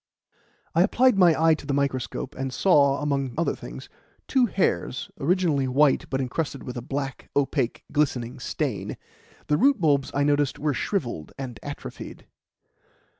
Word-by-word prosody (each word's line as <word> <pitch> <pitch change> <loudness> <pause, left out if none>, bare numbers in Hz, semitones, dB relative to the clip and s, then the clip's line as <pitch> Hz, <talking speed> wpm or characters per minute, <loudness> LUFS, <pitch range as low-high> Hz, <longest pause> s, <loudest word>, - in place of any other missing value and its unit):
I - - +4
applied 255 -2 +4
my 170 -4 +5
eye 160 0 +5
to 155 - -5
the 140 - 0
microscope, 140 0 -2
and 135 -1 -4
saw, 140 -3 +3
among 140 -4 -1
other 170 - +1
things, - - -9 0.4
two 255 -2 +3
hairs 130 - -1
originally 160 -4 +1
white, 140 +2 +3
but 135 - -1
encrusted 140 +2 -3
with 125 - -6
a 120 - -4
black, 135 +1 -5
opaque, 135 -3 0
glistening 130 -4 0
stain. - - -3 0.5
The 150 - +2
root 275 - +4
bulbs, 145 -5 +2
I 140 - +2
noticed, 145 -1 +1
were 150 0 0
shrivelled 120 - -3
and 125 -4 -6
atrophied. - - -8
140 Hz, 150 wpm, -25 LUFS, 130-155 Hz, 0.5 s, my